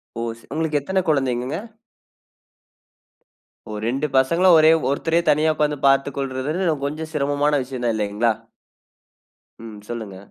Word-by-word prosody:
ஓ! 115 - -4 0.2
ச - - -20
உங்களுக்கு 155 -2 0
எத்தன 190 +5 0
குழந்தைங்கங்க? 135 0 0 2.1
ஓ 105 - -5
2 135 +6 -1
பசங்கள 170 +8 +3
ஒரே 155 +1 +6 0.2
ஒருத்தரே 165 +4 +1
தனியா 155 +1 +3
உட்கார்ந்து 150 -2 0
பார்த்து 135 +1 +3
கொள்றதுன்றது 150 +5 -1
கொஞ்சம் 155 +2 -5
சிரமமான 145 0 +1
விஷயம் 125 -1 -7
தான் 115 -2 +1
இல்லைங்களா? 105 +2 +1 1.3
ம். 110 -2 -9
சொல்லுங்க. 110 -5 -6
140 Hz, 120 wpm, -22 LUFS, 125-155 Hz, 2.1 s, ஒரே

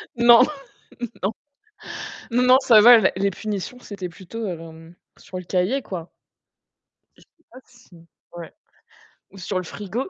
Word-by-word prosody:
Non, 235 0 +7 0.8
non. 195 +4 0 1.0
Non, 245 +2 +1
non, 255 +1 +6
ça 235 -5 +6
va, 235 +2 +9
la 195 - +2
les 200 +1 0
punitions, 210 +4 -6
c'était 200 -6 -7
plutôt, 200 +5 -8
hem, 165 -1 -9 0.2
sur 185 - -9
le 180 - -9
cahier, 190 +10 -1
quoi. 175 -3 -7 1.1
Je - - -21
sais 330 - -29
pas 255 - -13
si 175 -9 -20 0.3
ouais, 170 -2 -10 0.8
ou 195 - -15
sur 185 +1 -3
le 185 - -2
frigo? 210 - -6
200 Hz, 150 wpm, -22 LUFS, 180-235 Hz, 1.1 s, va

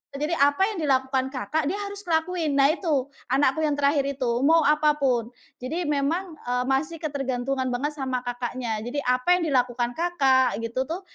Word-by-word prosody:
e - - -3
jadi 335 +3 0
apa 285 +6 +3
yang 420 - -5
dilakukan 265 -2 +1
kakak 300 +4 -2
dia 350 - 0
harus 405 0 -7
ngelakuin. 320 -2 0
Nah 275 +1 +5
itu, 295 -6 -1 0.2
anakku 275 +2 +2
yang 295 - +1
terakhir 280 -1 +2
itu, 250 -2 -1 0.2
mau 330 0 +5
apapun. 295 -6 +2 0.3
Jadi 315 +8 -3
memang, 310 +4 -1
eee, 250 0 0
masih 310 +5 -1
ketergantungan 270 -2 -2
banget 255 +5 -1
sama 255 -2 -2
kakaknya. 245 -2 -3
Jadi 285 +4 -3
apa 250 +4 0
yang 355 - -1
dilakukan 245 -2 +1
kakak 275 -7 +2
gitu 230 +3 -3
tuh, 340 +4 -4
280 Hz, 170 wpm, -25 LUFS, 255-315 Hz, 0.3 s, Nah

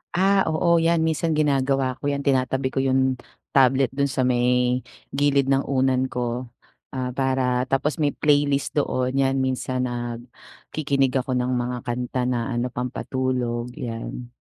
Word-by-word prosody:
Ah, 195 +1 +3
oo, 170 +2 +3
yan 165 0 +2
minsan 160 0 0
ginagawa 135 -3 +1
ko 145 - -3
yan. 140 -1 -1
Tinatabi 130 -1 +1
ko - - -1
yun 130 -1 +1 0.3
tablet 135 -1 +4
dun 140 +1 0
sa 130 -1 -1
may 125 0 +2 0.3
gilid 140 -1 +2
ng 135 0 +2
unan 130 -1 +2
ko 125 0 -3 0.5
ah 125 -1 -2
para 130 -1 0
tapos 140 +4 0
may 145 -2 +1
playlist 145 -2 +2
doon 130 -2 0
'yan, 135 0 +1
minsan 130 0 -1
nag 120 -1 -4 0.5
kikinig 140 -3 +1
ako 130 0 -2
ng 125 0 0
mga 125 0 -1
kanta 125 0 -2
na 120 -2 -1
ano 120 +1 -2
pampatulog 125 -1 -2
yan. 120 +1 -6
130 Hz, 150 wpm, -23 LUFS, 125-140 Hz, 0.5 s, tablet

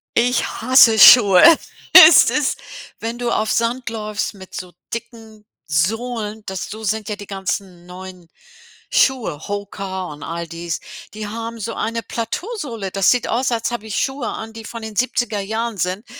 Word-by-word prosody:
ich 245 +1 +2
hasse 235 -2 +4
Schuhe. 200 -5 +8 0.6
Es 320 - +6
ist 295 -2 -1 0.4
wenn 230 +1 -5
du 240 -1 -2
auf 215 -1 0
Sand 235 +2 -1
läufst 215 -2 -4
mit 190 -2 -14
so 180 -1 -8 0.2
dicken 225 -2 -9 0.2
Sohlen, 215 +6 -2
das 190 -1 -5
so 220 +1 -8
sind 220 +1 -2
ja 210 - -3
die 205 -1 -11
ganzen 190 -2 -5
neuen 180 -1 -11 0.6
Schuhe, 225 - 0
HOKA 195 -2 -5
und 145 - -12
all 170 0 -5
dies. 170 0 -5 0.3
Die 215 0 -6
haben 230 +2 -6
so 225 +1 -5
eine 230 +1 -3
Plateausohle. 235 - -5
Das 195 0 +3
sieht 245 -2 0
aus, 250 +3 -1
als 230 -1 -1
habe 240 -2 -5
ich 215 - -4
Schuhe 265 -3 -3
an, 220 +1 -6
die 225 0 -10
von 230 +1 -8
den 220 -1 -8
70er 240 -2 -1
Jahren 220 +2 -4
sind. 185 +5 -3
220 Hz, 165 wpm, -19 LUFS, 195-235 Hz, 0.6 s, Schuhe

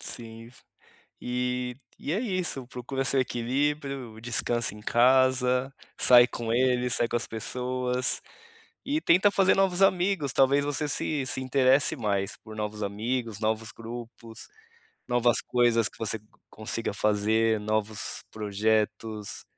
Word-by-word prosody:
Sim. 115 0 -9 0.7
E 125 0 -2 0.2
e 145 - -3
é 195 - 0
isso, 185 - -2
procura 130 +2 -4
seu 135 0 +2
equilíbrio, 130 -1 -2
descansa 120 0 0
em 105 - -12
casa, 130 +2 +3 0.3
sai 120 -1 +7
com 115 -2 -4
ele, 125 0 +2
sai 120 -1 +2
com 120 - -1
as 120 - -2
pessoas, 125 +2 -2 0.6
e 295 +3 0
tenta 185 - +4
fazer 195 -1 +3
novos 195 -1 +2
amigos 180 -6 +2
talvez 140 +1 +3
você 145 +1 -1
se 145 -1 -1
se 130 - -1
interesse 130 +3 +3
mais 100 -5 -1
por 110 -1 -12
novos 105 0 -4
amigos, 115 +2 -3
novos 110 0 -1
grupos, 115 0 -9 0.6
novas 120 -1 +2
coisas 120 -2 +2
que - - -19
você 110 0 -2
co 105 +1 -29
consiga 110 0 -4
fazer, 110 +2 +1
novos 110 +1 -2
projetos, 105 0 -1
120 Hz, 130 wpm, -27 LUFS, 110-135 Hz, 0.7 s, sai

